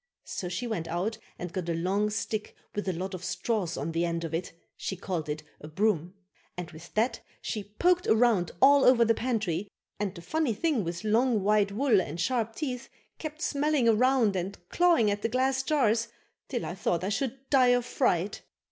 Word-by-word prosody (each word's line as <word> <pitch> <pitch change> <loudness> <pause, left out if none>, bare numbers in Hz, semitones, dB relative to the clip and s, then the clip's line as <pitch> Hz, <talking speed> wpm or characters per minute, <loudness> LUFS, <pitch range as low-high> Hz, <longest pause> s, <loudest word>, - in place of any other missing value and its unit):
So 180 - -4
she 185 +8 -3
went 185 -9 -3
out 200 +6 -2 0.2
and 175 -1 -6
got 175 -2 -3
a 165 - 0
long 195 +5 +1
stick 210 0 -3 0.2
with 205 -2 -2
a - - 0
lot 185 +3 -4
of 185 -1 -6
straws 180 -1 -1
on 165 - -3
the 165 +1 0
end 170 -1 -1
of 165 -1 -5
it 165 +2 -2 0.2
(she 190 - -4
called 170 -4 -3
it 150 +1 -3 0.2
a 150 - -9
broom), 180 0 0 0.4
and 180 -2 -5
with 160 +1 -12
that 225 +4 +1 0.2
she 205 -2 -5
poked 360 0 +3
around 220 -6 +4
all 280 0 +7
over 240 -2 +6
the 230 - +4
pantry, 215 -7 -1 0.3
and 205 -2 -2
the 170 - -9
funny 300 - 0
thing 285 -2 +1
with 170 +2 -4
long, 220 0 +2
white 205 0 +3
wool 225 -2 +3
and 165 0 -6
sharp 230 +1 0
teeth 260 -5 -4 0.3
kept 310 +1 -6
smelling 290 -3 +1
around 230 -2 +4
and 190 +2 -3
clawing 340 -12 +4
at 205 0 -2
the 225 - 0
glass 260 +2 +1
jars 235 -6 +2 0.4
till 245 -4 -3
I - - -4
thought 180 -2 -1
I 190 - 0
should 260 +5 -1
die 260 -3 +6
of 245 -1 +3
fright. 205 -7 0
210 Hz, 200 wpm, -28 LUFS, 180-250 Hz, 0.4 s, all